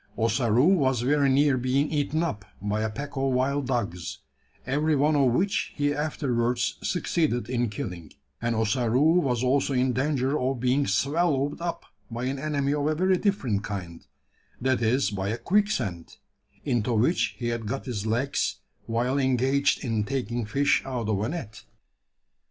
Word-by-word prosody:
Ossaroo 115 Hz, +2 st, +2 dB
was 130 Hz, -8 st, +2 dB
very 140 Hz, +2 st, +3 dB
near 140 Hz, -1 st, +3 dB
being 135 Hz, +4 st, +1 dB
eaten 155 Hz, +2 st, 0 dB
up 110 Hz, -12 st, -3 dB, 0.2 s
by 105 Hz, +2 st, -1 dB
a 110 Hz, -, 0 dB
pack 140 Hz, +6 st, -6 dB
of 135 Hz, -1 st, 0 dB
wild 135 Hz, +2 st, 0 dB
dogs 105 Hz, -9 st, -2 dB, 0.5 s
every 150 Hz, +4 st, +1 dB
one 150 Hz, +2 st, +3 dB
of 135 Hz, -4 st, +4 dB
which 190 Hz, -, 0 dB
he 145 Hz, 0 st, +1 dB
afterwards 125 Hz, -5 st, -1 dB
succeeded 160 Hz, -8 st, 0 dB
in 120 Hz, -2 st, 0 dB
killing; 90 Hz, -6 st, -6 dB, 0.3 s
and 115 Hz, 0 st, 0 dB
Ossaroo 125 Hz, +8 st, +3 dB
was 125 Hz, -6 st, 0 dB
also 135 Hz, +2 st, +2 dB
in 130 Hz, 0 st, +2 dB
danger 135 Hz, +1 st, 0 dB
of 130 Hz, 0 st, -1 dB
being 130 Hz, +3 st, +1 dB
swallowed 145 Hz, -1 st, +1 dB
up 170 Hz, -1 st, -4 dB, 0.2 s
by 120 Hz, +1 st, -5 dB
an 135 Hz, +1 st, -2 dB
enemy 140 Hz, -1 st, 0 dB
of 145 Hz, 0 st, 0 dB
a 155 Hz, -, +1 dB
very 185 Hz, +3 st, +2 dB
different 130 Hz, -, 0 dB
kind 90 Hz, -6 st, -6 dB, 0.5 s
that 130 Hz, -1 st, +1 dB
is 115 Hz, -1 st, +2 dB
by 95 Hz, -1 st, -2 dB
a 115 Hz, -, -1 dB
quicksand, 120 Hz, -, -1 dB, 0.5 s
into 120 Hz, -3 st, 0 dB
which 125 Hz, +11 st, +1 dB
he 120 Hz, -1 st, -2 dB
had 115 Hz, -2 st, -3 dB
got 135 Hz, +5 st, -3 dB
his 110 Hz, -5 st, -3 dB
legs 120 Hz, +5 st, 0 dB, 0.3 s
while 125 Hz, +4 st, 0 dB
engaged 130 Hz, +1 st, +2 dB
in 110 Hz, -3 st, 0 dB
taking 120 Hz, -1 st, -2 dB
fish 140 Hz, +5 st, +2 dB
out 125 Hz, -5 st, -3 dB
of 100 Hz, -2 st, 0 dB
a 110 Hz, -, -1 dB
net! 145 Hz, -10 st, -6 dB
130 Hz, 165 wpm, -26 LUFS, 115-145 Hz, 0.5 s, of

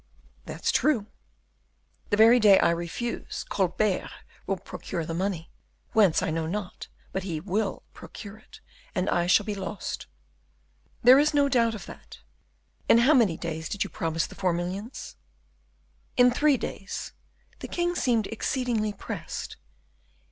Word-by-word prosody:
_" -, -, -36 dB, 0.4 s
"That's -, -, -1 dB
true." 250 Hz, -9 st, +2 dB, 1.0 s
"The 205 Hz, -, +1 dB
very 230 Hz, +3 st, +7 dB
day 205 Hz, -3 st, +7 dB
I -, -, +4 dB
refuse, 170 Hz, +8 st, -4 dB
Colbert 190 Hz, +1 st, 0 dB, 0.4 s
will 195 Hz, 0 st, 0 dB
procure 170 Hz, -2 st, -5 dB
the 165 Hz, -, -4 dB
money; 175 Hz, -2 st, -3 dB, 0.4 s
whence 205 Hz, -7 st, +4 dB
I -, -, -1 dB
know 160 Hz, 0 st, -2 dB
not, 195 Hz, +2 st, -5 dB, 0.2 s
but 190 Hz, -, -2 dB
he 175 Hz, -5 st, -4 dB
will 195 Hz, +4 st, -2 dB
procure 205 Hz, +1 st, -10 dB
it: -, -, -17 dB, 0.3 s
and 185 Hz, +1 st, 0 dB
I 175 Hz, 0 st, +1 dB
shall 180 Hz, -, +4 dB
be 210 Hz, -, -2 dB
lost." 195 Hz, +1 st, -5 dB, 1.0 s
"There 255 Hz, +3 st, +9 dB
is 300 Hz, +1 st, +2 dB
no 285 Hz, -1 st, +4 dB
doubt 230 Hz, -3 st, +2 dB
of 210 Hz, -, -8 dB
that. -, -, -12 dB, 0.7 s
In -, -, +8 dB
how 250 Hz, +6 st, +5 dB
many 215 Hz, -, +3 dB
days 160 Hz, -2 st, -4 dB
did 205 Hz, -, -1 dB
you -, -, -8 dB
promise 165 Hz, -3 st, -1 dB
the -, -, -11 dB
four 185 Hz, -3 st, 0 dB
millions?" 185 Hz, +7 st, -5 dB, 1.0 s
"In 250 Hz, 0 st, +6 dB
three 290 Hz, +2 st, +3 dB
days. 195 Hz, -4 st, -6 dB, 0.5 s
The -, -, -6 dB
king 350 Hz, 0 st, -1 dB
seemed 235 Hz, -, +1 dB
exceedingly 225 Hz, -1 st, -1 dB
pressed." -, -, -6 dB
205 Hz, 150 wpm, -27 LUFS, 180-235 Hz, 1.0 s, There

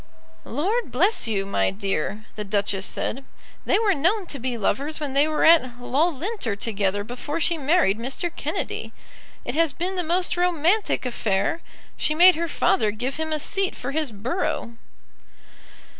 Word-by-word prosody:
"Lord 355 Hz, -, -1 dB
bless 355 Hz, -, +2 dB
you, 200 Hz, -3 st, -1 dB
my 195 Hz, -, +1 dB
dear," 195 Hz, +1 st, -3 dB
the 210 Hz, -, -4 dB
Duchess 200 Hz, -1 st, 0 dB
said, 270 Hz, +4 st, -3 dB, 0.4 s
"they -, -, +3 dB
were 425 Hz, -2 st, +3 dB
known 370 Hz, +7 st, +1 dB
to 280 Hz, -, -6 dB
be 250 Hz, 0 st, -3 dB
lovers 280 Hz, +8 st, -1 dB
when 290 Hz, -3 st, -3 dB
they 285 Hz, +2 st, +4 dB
were 310 Hz, -1 st, 0 dB
at 255 Hz, -7 st, +5 dB
Loughlinter 300 Hz, -, -1 dB
together 205 Hz, -2 st, -1 dB
before 255 Hz, +8 st, -5 dB
she 335 Hz, +1 st, +2 dB
married 295 Hz, -, +2 dB
Mr. 270 Hz, +8 st, -3 dB
Kennedy. -, -, -4 dB, 0.5 s
It 245 Hz, -, -3 dB
has 325 Hz, 0 st, +2 dB
been 370 Hz, +2 st, -3 dB
the -, -, +1 dB
most 350 Hz, +2 st, +1 dB
romantic 355 Hz, +1 st, +1 dB
affair! 230 Hz, -, 0 dB, 0.4 s
She 305 Hz, -, 0 dB
made 360 Hz, +3 st, +8 dB
her 335 Hz, +1 st, -2 dB
father 220 Hz, -7 st, +2 dB
give 245 Hz, +6 st, -3 dB
him 315 Hz, 0 st, -3 dB
a 310 Hz, -, +1 dB
seat 385 Hz, +5 st, 0 dB
for 250 Hz, -, -5 dB
his 300 Hz, -3 st, -1 dB
borough." 235 Hz, -, -3 dB
285 Hz, 160 wpm, -24 LUFS, 225-340 Hz, 0.5 s, made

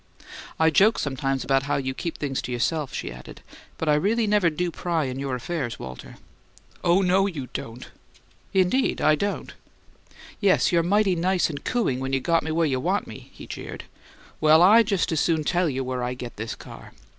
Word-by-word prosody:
"I 160 Hz, 0 st, +4 dB
joke 210 Hz, +8 st, +4 dB
sometimes 135 Hz, -1 st, -2 dB
about 135 Hz, 0 st, +2 dB
how -, -, +2 dB
you 130 Hz, -1 st, -2 dB
keep 170 Hz, +5 st, -5 dB
things 135 Hz, -3 st, -2 dB
to -, -, -6 dB
yourself," 140 Hz, +4 st, -1 dB
she -, -, -5 dB
added, 60 Hz, 0 st, -11 dB, 0.4 s
"but 160 Hz, -, -3 dB
I 150 Hz, -, +4 dB
really 210 Hz, +9 st, +2 dB
never 205 Hz, -4 st, +3 dB
do 175 Hz, +2 st, -2 dB
pry 165 Hz, -2 st, -1 dB
in 130 Hz, 0 st, -4 dB
your 135 Hz, -2 st, -2 dB
affairs, 125 Hz, -1 st, -4 dB
Walter." 65 Hz, -1 st, -9 dB, 0.7 s
"Oh, 180 Hz, +2 st, +3 dB
no, 190 Hz, +2 st, +3 dB
you 145 Hz, -9 st, -6 dB
don't!" 115 Hz, +2 st, -7 dB, 0.6 s
"Indeed, 190 Hz, +8 st, +2 dB
I 155 Hz, -, +4 dB
don't." 200 Hz, +6 st, -2 dB, 0.9 s
"Yes, 200 Hz, -3 st, +3 dB
you're 170 Hz, -1 st, +3 dB
mighty 195 Hz, +2 st, +2 dB
nice 180 Hz, 0 st, +1 dB
and 145 Hz, -1 st, -7 dB
cooing 215 Hz, -, 0 dB
when 135 Hz, 0 st, -3 dB
you 135 Hz, -, +2 dB
got 165 Hz, +5 st, +1 dB
me 160 Hz, -, -5 dB
where 165 Hz, +1 st, +1 dB
you 135 Hz, -4 st, 0 dB
want -, -, 0 dB
me," -, -, -11 dB
he -, -, -12 dB
jeered. -, -, -7 dB, 0.6 s
"Well, 155 Hz, +2 st, +6 dB
I 215 Hz, +5 st, +8 dB
just 200 Hz, -6 st, 0 dB
as 160 Hz, -, +1 dB
soon 160 Hz, -1 st, +1 dB
tell 175 Hz, +2 st, +1 dB
you 135 Hz, -1 st, -2 dB
where 130 Hz, -1 st, -3 dB
I 125 Hz, +1 st, -2 dB
get 125 Hz, -1 st, -8 dB
this 110 Hz, +2 st, -5 dB
car." -, -, -12 dB
160 Hz, 200 wpm, -24 LUFS, 135-180 Hz, 0.9 s, I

